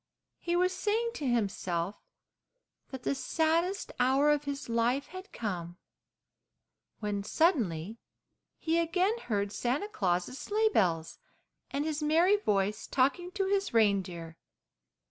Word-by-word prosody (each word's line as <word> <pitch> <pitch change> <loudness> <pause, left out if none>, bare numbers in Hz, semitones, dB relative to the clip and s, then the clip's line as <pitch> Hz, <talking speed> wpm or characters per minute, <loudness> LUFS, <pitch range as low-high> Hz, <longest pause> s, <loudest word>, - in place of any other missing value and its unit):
He 345 0 -1
was 365 +1 +2
saying 440 +5 0
to 295 - -3
himself 195 -6 -1 0.9
that 260 -2 -8
the - - +1
saddest 330 +7 0
hour 270 +4 +4
of 295 0 +1
his 280 0 -4
life 235 +4 +1
had 370 +2 -9
come, 175 -6 -4 1.2
when 205 -1 -2
suddenly 215 - +1 0.6
he 330 +1 +1
again 365 +6 +1
heard 205 - -2
Santa 255 - -1
Claus' 185 - -1
sleigh 435 +1 +1
bells 165 - 0 0.5
and 285 +2 -2
his 310 -1 -2
merry 330 +6 +4
voice 210 - 0
talking 280 +7 +1
to 390 -1 0
his 395 -7 0
reindeer. 185 -6 +1
270 Hz, 125 wpm, -30 LUFS, -, 1.2 s, hour